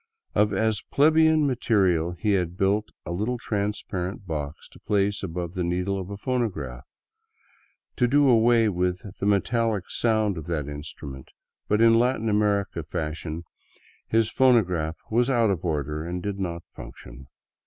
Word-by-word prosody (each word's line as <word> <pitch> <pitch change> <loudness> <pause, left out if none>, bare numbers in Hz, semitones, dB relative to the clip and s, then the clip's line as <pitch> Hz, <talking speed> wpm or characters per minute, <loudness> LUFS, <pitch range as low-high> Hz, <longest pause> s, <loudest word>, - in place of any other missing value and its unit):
Of 105 -1 +3
as 110 0 +1
plebeian 160 +1 +4
materials 95 - +1
he 105 - 0
had 90 -3 0
built 100 +2 +1 0.2
a - - -5
little 105 +8 -1
transparent 100 -3 -3
box 75 -3 -5
to - - -17
place 100 -1 0
above 85 -2 -4
the 90 -2 -2
needle 90 +3 -1
of 95 0 -6
a 100 - -6
phonograph, 95 - -3 1.1
to 125 - +3
do 145 +3 +4
away 115 -1 +5
with 90 -2 -1 0.2
the 100 - -1
metallic 105 0 +1
sound 110 -5 +1
of 80 - -10
that 75 -5 -2
instrument 75 -2 -8 0.2
— - - -63
but 105 +1 +3
in 115 0 +6
Latin 120 -2 +1
American 100 -5 +1
fashion 80 +1 -4 0.6
his 110 -1 +2
phonograph 90 -11 +2
was 120 +3 +2
out 115 -5 +3
of 90 -5 -3
order 75 -2 -2
and 90 +1 -4
did 100 -1 -3
not 85 -3 -3
" - - -44
function." 60 +2 -11
100 Hz, 155 wpm, -25 LUFS, 85-115 Hz, 1.1 s, in